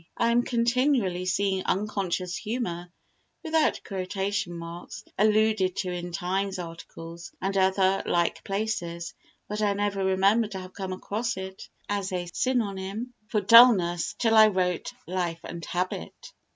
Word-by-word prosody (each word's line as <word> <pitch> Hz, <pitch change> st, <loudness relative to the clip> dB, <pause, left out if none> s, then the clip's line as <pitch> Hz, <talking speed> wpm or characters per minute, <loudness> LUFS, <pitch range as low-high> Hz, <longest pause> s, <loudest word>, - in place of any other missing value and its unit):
I 235 Hz, -, +2 dB
am 240 Hz, +1 st, +4 dB
continually 235 Hz, -6 st, +1 dB
seeing 190 Hz, 0 st, +1 dB
unconscious 185 Hz, -3 st, -1 dB
humour 180 Hz, -7 st, -4 dB, 0.5 s
(without 320 Hz, -1 st, +1 dB
quotation 195 Hz, -1 st, -2 dB
marks) 170 Hz, +1 st, -8 dB
alluded 215 Hz, -3 st, +3 dB
to 185 Hz, -3 st, -2 dB
in 175 Hz, 0 st, -5 dB
Times 190 Hz, +3 st, -1 dB
articles 165 Hz, 0 st, -9 dB
and 195 Hz, +1 st, -2 dB
other 190 Hz, 0 st, +3 dB
like 170 Hz, -1 st, +1 dB
places, 195 Hz, -5 st, -3 dB, 0.3 s
but 210 Hz, +1 st, -3 dB
I 205 Hz, -1 st, +2 dB
never 200 Hz, -1 st, -1 dB
remember 195 Hz, +4 st, +3 dB
to 195 Hz, -2 st, -6 dB
have 185 Hz, 0 st, -10 dB
come 190 Hz, -2 st, -5 dB
across 220 Hz, +4 st, -3 dB
it 190 Hz, 0 st, -7 dB, 0.2 s
as 200 Hz, -1 st, -2 dB
a 180 Hz, -1 st, -2 dB
synonym 220 Hz, -1 st, -1 dB
for 215 Hz, -2 st, 0 dB
dullness 195 Hz, -6 st, +6 dB
till 225 Hz, -2 st, +2 dB
I 220 Hz, -1 st, +8 dB
wrote 180 Hz, -4 st, -1 dB
Life 175 Hz, -2 st, -2 dB
and 170 Hz, -1 st, -7 dB
Habit. 180 Hz, -, -4 dB
195 Hz, 140 wpm, -27 LUFS, 180-215 Hz, 0.5 s, I